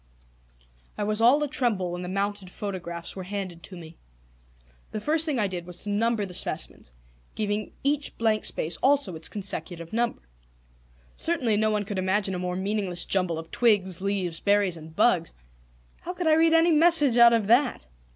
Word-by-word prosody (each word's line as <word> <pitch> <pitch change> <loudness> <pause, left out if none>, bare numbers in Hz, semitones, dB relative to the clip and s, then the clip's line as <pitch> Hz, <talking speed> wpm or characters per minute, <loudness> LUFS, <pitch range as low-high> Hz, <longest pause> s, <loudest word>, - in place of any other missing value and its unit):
I 210 - -2
was 210 +1 -1
all 265 +6 +5
a - - 0
tremble 235 -11 -1
when 175 0 -5
the 180 - -5
mounted 200 0 -2
photographs 175 -4 -6
were 190 - -6
handed 185 -2 -5
to 185 - -8
me. 165 -1 -12 0.9
The 215 - -4
first 315 +7 +3
thing 295 -4 0
I 215 - +2
did 180 -3 -5
was 180 0 -6
to 205 - -3
number 220 0 +1
the 185 - -10
specimens, - - -4 0.4
giving 210 0 -2
each 285 +1 -1
blank 220 -2 +1
space 160 - 0
also 270 -9 +2
its 160 - -2
consecutive 180 -4 -5
number. 235 +1 -1 0.9
Certainly 255 -11 0
no 215 +1 +2
one 210 -1 -1
could 200 -1 -4
imagine 190 +1 +1
a 180 - -3
more 180 0 -3
meaningless 190 -2 -2
jumble 180 -4 0
of 160 0 -8
twigs, 195 -7 +2
leaves, 190 -4 -1
berries, 200 -3 +2
and 160 0 -12
bugs. 185 -6 +2 0.6
How 360 - -6
could 360 -1 -4
I 315 - +5
read 325 +1 +4
any 330 +1 +5
message 305 -6 +5
out 235 0 +9
of 225 -3 +2
that? 245 +5 +2
205 Hz, 180 wpm, -26 LUFS, 180-235 Hz, 0.9 s, out